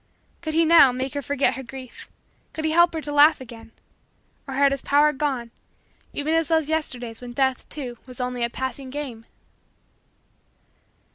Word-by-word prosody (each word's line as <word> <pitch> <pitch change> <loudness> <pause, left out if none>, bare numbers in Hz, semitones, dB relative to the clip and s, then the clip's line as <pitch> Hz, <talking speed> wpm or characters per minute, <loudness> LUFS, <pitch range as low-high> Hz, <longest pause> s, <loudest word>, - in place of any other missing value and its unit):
Could 315 -2 -4
he, 330 0 +4
now, 320 -5 +7
make 260 +2 -4
her 285 - -2
forget 280 -1 +1
her 265 - -6
grief 260 -1 -10 0.4
could 315 - -4
he 315 - +1
help 345 +1 +4
her 320 - -2
to 295 -1 -4
laugh 295 +2 +6
again 230 -3 -11 0.8
or 270 - -5
had 280 0 +4
his 275 -1 -2
power 295 +1 +3
gone 265 -5 -2 0.6
even 300 +2 -1
as 325 -1 +2
those 320 -2 +1
Yesterdays 245 -8 -3
when 245 -1 -8
Death, 265 0 0
too, 250 -5 -6
was 250 -1 -7
only 250 -1 -2
a 235 - +1
pleasing 260 +2 -5
game? 255 -5 -7
270 Hz, 170 wpm, -24 LUFS, 250-300 Hz, 0.8 s, now